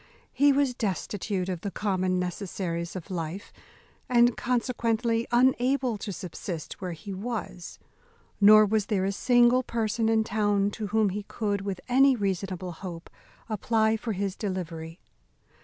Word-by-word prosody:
He 285 +3 +5
was 275 -2 +2
destitute 200 -3 -2
of 180 -3 -3
the 200 - -3
common 185 -2 0
necessaries 180 -1 -3
of 185 +1 -7
life, 170 +3 -5 0.6
and 240 -1 +4
consequently 235 -2 0
unable 255 0 +2
to 200 - -5
subsist 175 -1 -6
where 180 -2 -3
he 195 +5 -8
was; 200 -3 -5 0.6
nor 215 +1 +8
was 210 0 0
there 195 -3 0
a 195 - 0
single 245 +3 +4
person 225 -2 -1
in 220 -1 +3
town 205 -2 +1
to 210 0 -5
whom 215 0 +2
he 205 +3 -3
could, 205 -3 -2
with 195 -2 -4
any 265 +2 +5
reasonable 190 -3 -2
hope, 170 -1 -8 0.4
apply 220 +1 +1
for 225 0 -3
his 195 0 -2
delivery. 170 -4 -5
205 Hz, 140 wpm, -27 LUFS, 185-230 Hz, 0.6 s, nor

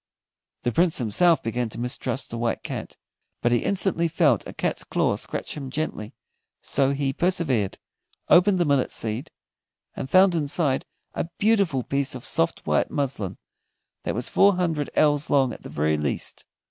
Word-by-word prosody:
The 120 - +1
Prince 170 +6 +3
himself 160 - +3
began 115 +1 -2
to 110 - -8
mistrust 125 +2 -3
the 115 - -4
White 115 -1 -1
Cat, - - -6 0.5
but 120 - +3
he 120 - +4
instantly 185 - +1
felt 155 - +2
a - - -8
cat's - - -1
claw - - 0
scratch - - -5
him 140 -3 -6
gently, 130 -7 -4 0.4
so 135 -1 +1
he 140 -1 -1
persevered, 140 - 0 0.5
opened 185 +2 +5
the 175 - +2
millet 140 -3 +1
seed, 115 +7 -3 0.7
and 130 - -5
found 185 +2 +6
inside 145 -3 0 0.3
a 165 - -3
beautiful 200 - +2
piece 140 0 -1
of 125 - -7
soft 85 - 0
white - - +1
muslin 110 -10 -2 0.6
that - - -3
was 120 +2 -2
four 200 0 +4
hundred 165 -5 -1
ells 145 -1 +3
long 135 -4 +3
at - - -11
the - - -9
very 75 +1 0
least. 75 -1 -3
140 Hz, 165 wpm, -24 LUFS, 120-170 Hz, 0.7 s, found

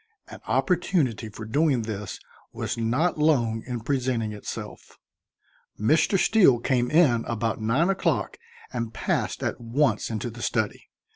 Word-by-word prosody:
An - - -10
opportunity 155 - +1
for 110 +1 -8
doing 140 +1 +1
this 105 -3 -5 0.3
was - - -3
not 125 +9 0
long 120 -8 +2
in 120 -2 -4
presenting 120 -4 -1
itself. 105 - -8 0.8
Mr. 155 - +3
Steele 185 - +5
came 125 0 0
in 145 -8 +4
about 115 -1 -2
nine 125 +10 +2
o'clock 165 - -1 0.3
and 115 -2 -4
passed - - -1
at - - -2
once 120 -1 +1
into 115 +1 -3
the 120 +2 -10
study. 110 -4 -2
120 Hz, 135 wpm, -25 LUFS, 110-150 Hz, 0.8 s, Steele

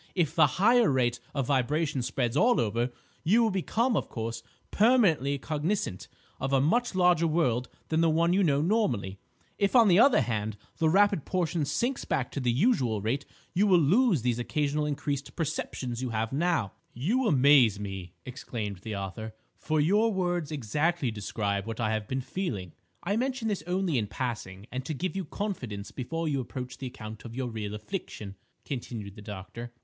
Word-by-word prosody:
If 165 -5 +1
the - - +6
higher 230 +4 +5
rate 120 -2 +1 0.2
of 135 -3 0
vibration 145 +2 +1
spreads 125 0 -1
all 240 +9 +4
over, 115 +3 0 0.3
you 215 +9 +4
will 220 - +2
become, 225 +6 0
of - - -1
course, 115 0 -4 0.3
permanently 195 - +3
cognisant 155 - -2 0.3
of 135 +1 -2
a 135 - +4
much 225 - +1
larger 180 -2 +4
world 125 -7 +1 0.2
than 160 0 +2
the 165 - +4
one 165 +2 +3
you 195 - +3
know 145 -5 +3
normally. 125 - 0 0.4
If, 200 +4 +1
on 235 -3 +7
the 180 +2 +6
other 260 - +6
hand, 110 -3 -2 0.2
the 160 -1 +3
rapid 200 -2 +4
portion 170 -4 -1
sinks 240 - -1
back 130 -5 -1
to - - -3
the 125 -2 +1
usual 125 - +2
rate, 120 +8 -2 0.3
you 200 +4 +3
will 185 -3 +6
lose 175 - +3
these 120 -1 0
occasional 150 +3 0
increased 145 -1 -3
perceptions 135 -6 -3
you 130 - -2
now - - -5
have." 140 - 0 0.2
"You 220 - +1
amaze 135 - +5
me!" 95 -3 -6
exclaimed 115 -5 -5
the 105 +3 -6
author; 105 +3 -6 0.2
"for 155 0 0
your 205 +9 +3
words 175 -5 -1
exactly 150 +2 0
describe 100 -1 -2
what 115 0 -5
I 110 -2 +1
have 110 -1 -2
been 130 0 -2
feeling—" 125 - -4 0.3
"I 200 +4 0
mention 255 -2 -1
this 200 -6 -1
only 180 -6 +1
in 105 - -2
passing, 105 -6 -5
and 130 +1 -3
to 155 +3 -4
give 185 +6 -3
you 190 -2 -2
confidence 125 - -5
before 165 +6 -3
you 140 -3 0
approach 125 0 -7
the 135 - -4
account 110 -3 -9
of 115 -1 -9
your 130 -1 -2
real 105 -2 -4
affliction," 105 - -6 0.3
continued 115 -7 -5
the 105 - -11
doctor. 105 +4 -8
140 Hz, 180 wpm, -28 LUFS, 115-180 Hz, 0.4 s, on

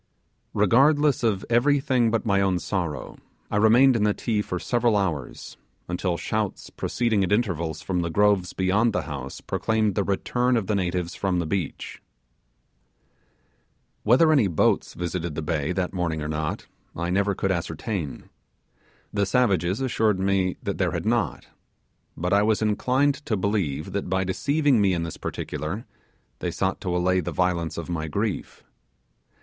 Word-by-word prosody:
Regardless 140 +7 +4
of 105 -5 0
everything 130 0 +3
but 115 +1 -1
my 100 -2 +2
own 95 -2 +2
sorrow, 85 -7 -4 0.3
I - - +1
remained 120 +5 +6
in 110 - +1
the 105 -1 +2
Ti 110 -3 -1
for 90 - -4
several 120 +2 +1
hours, 85 -10 -3 0.3
until 90 0 -1
shouts - - -3
proceeding 115 -4 0
at 90 - -1
intervals 85 -8 0
from 90 -2 -1
the 85 - -2
groves 100 -1 +2
beyond 100 +5 +2
the - - 0
house 70 -4 -7
proclaimed 110 -2 0
the 100 - 0
return 120 +6 +1
of 110 - -1
the 105 - -1
natives 90 -3 -1
from 95 -2 -1
the 85 - 0
beach. 90 -1 -4 2.0
Whether 130 +9 +5
any 135 -9 +4
boats 85 -4 +1
visited 85 -2 -3
the 80 - -3
bay 75 -1 -1
that 90 +1 -2
morning 85 -4 -2
or - - -3
not, 75 0 -3 0.3
I 85 +1 -2
never 100 +1 +1
could 95 - 0
ascertain. 85 - -4 0.9
The 100 -1 +1
savages 100 -4 +1
assured 110 -6 +1
me 95 -1 +1
that - - -3
there - - +1
had - - -3
not 115 -4 0 0.7
but 90 +4 -1
I 100 - +5
was 110 +1 +2
inclined 130 +7 +1
to 110 - +1
believe 90 -7 -1
that 100 -2 -3
by 95 0 +1
deceiving 140 +6 +2
me 95 -2 +3
in 85 - -2
this 85 - -6
particular 75 - -4 0.5
they 90 - -2
sought 95 +3 -2
to 90 -2 -1
allay 90 +1 +2
the 85 -1 -3
violence 85 -1 0
of 85 - -5
my 80 -3 -3
grief. 100 +6 -3
95 Hz, 160 wpm, -25 LUFS, 85-110 Hz, 2.0 s, remained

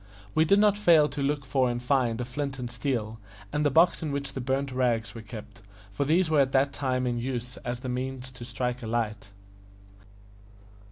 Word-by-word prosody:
We 160 - +4
did 200 +5 +5
not 205 0 +4
fail 165 -7 +6
to 145 - -5
look 140 0 0
for 130 -1 +2
and 120 0 -2
find 125 -2 +1
a 125 - -2
flint 135 +2 -4
and 120 -2 -5
steel, 115 -4 -2 0.3
and 150 - +1
the 145 - +4
box 165 +6 +4
in 155 -3 -2
which 140 -1 -3
the 135 - -4
burnt 135 +2 -1
rags 120 -3 0
were 115 - -8
kept, 110 0 -10 0.3
for 140 - -1
these 170 +5 +3
were 155 -2 +4
at 135 -1 0
that 135 +1 +3
time 130 -2 -1
in 120 -1 -1
use 125 0 -4
as 120 -1 -5
the 130 - -5
means 130 +1 -4
to 125 -1 -10
strike 125 +1 -3
a 115 - -6
light. 110 -3 -2
130 Hz, 210 wpm, -27 LUFS, 120-140 Hz, 0.3 s, fail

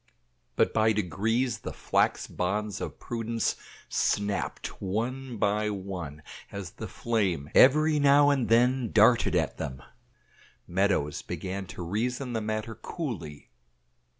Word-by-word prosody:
But - - +2
by 110 0 +3
degrees 110 +5 0
the - - -6
flax - - +1
bonds 105 +2 -2
of - - -5
prudence 115 -1 -2 0.3
snapped 100 0 -1
one 120 +6 -3
by 105 +1 +1
one 90 -7 -6 0.3
as 100 -4 -6
the - - -7
flame 95 -11 -1
every 155 +3 +6
now 145 0 +6
and 135 -4 0
then 125 +1 +3
darted 110 +2 +5
at - - 0
them. 65 -1 -5 0.8
Meadows 90 -6 +1
began 95 0 -5
to 90 0 -7
reason 120 +8 -2
the 110 - -1
matter 110 +1 -3
coolly. 110 - -6
110 Hz, 125 wpm, -28 LUFS, 95-120 Hz, 0.8 s, every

